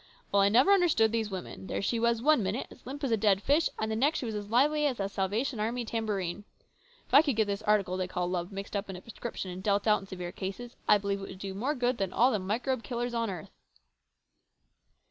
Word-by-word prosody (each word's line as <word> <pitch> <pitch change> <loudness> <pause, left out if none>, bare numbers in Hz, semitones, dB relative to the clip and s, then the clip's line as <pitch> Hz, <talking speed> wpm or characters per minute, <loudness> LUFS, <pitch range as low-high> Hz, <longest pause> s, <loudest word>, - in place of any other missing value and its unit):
Well, 200 - +4
I 200 - +5
never 250 - +5
understood 330 - +4
these 225 -2 -1
women. 190 0 -7
There - - -2
she 230 +3 0
was 235 0 +1
one 305 -3 +5
minute 200 +6 -2
as - - -15
limp 285 +3 -7
as 265 - 0
a 225 - +3
dead 200 -2 +3
fish, 305 +4 +3
and 220 0 -2
the - - 0
next 280 +8 +2
she - - -3
was 225 - -3
as 205 -1 -5
lively 295 +6 +3
as 255 -6 -2
a 195 - 0
Salvation 210 +6 -1
Army 235 +3 -1
tambourine. 205 -5 -2 0.6
If - - -23
I 280 - +10
could 285 -6 0
get 220 0 +3
this 200 0 -3
article 205 -4 +1
they 185 -1 -1
call 180 -1 -2
love 180 +1 -2
mixed 195 +1 -6
up 200 0 -2
in 190 - -5
a 180 - -9
prescription, 230 -4 -6
and 180 +1 -7
deal 200 +1 +2
it 205 - -2
out 210 -1 +4
in 195 - -12
severe 180 -2 -6
cases, 215 +7 -6
I 210 - +7
believe 200 -1 -2
it 195 - -7
would - - -9
do 195 0 -5
more 255 +10 -1
good 245 -2 0
than 195 -2 -1
all 245 +5 +4
the 215 - 0
microbe 230 +6 -1
killers 240 +2 -3
on 230 -2 0
earth." 180 -5 -7
215 Hz, 255 wpm, -30 LUFS, 195-245 Hz, 0.6 s, I